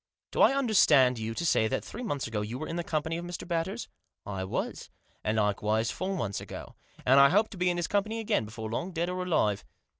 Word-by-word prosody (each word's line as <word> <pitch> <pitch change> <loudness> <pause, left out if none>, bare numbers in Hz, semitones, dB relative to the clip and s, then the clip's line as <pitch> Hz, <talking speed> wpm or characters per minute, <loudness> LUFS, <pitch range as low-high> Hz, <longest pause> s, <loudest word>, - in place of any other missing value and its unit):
"Do - - 0
I - - +7
understand 150 - +5
you 110 +1 -3
to 170 - -2
say 110 -9 +3
that - - -2
three 240 - -7
months 145 - -2
ago 115 -2 -2
you 110 +4 -4
were 155 - -5
in 165 - -4
the 175 - -2
company 160 +1 -1
of 170 - -5
Mr. 175 -1 -6
Batters? 175 +6 -2
" - - -49
" - - -60
I 95 -2 -4
was. 95 - -4 0.3
And 105 +1 0
likewise 105 +2 +1
four 190 +1 -3
months 100 - -2
ago. - - -8 0.3
And 135 +2 +6
I 140 0 +8
hope 210 +6 +3
to 200 - -10
be 180 0 +2
in 175 - 0
his 175 - 0
company 215 +3 0
again 205 - 0
before 110 0 -6
long, 175 +10 -3
dead 170 +1 -1
or 185 0 -3
alive. 110 - +1
160 Hz, 245 wpm, -29 LUFS, 110-180 Hz, 0.3 s, I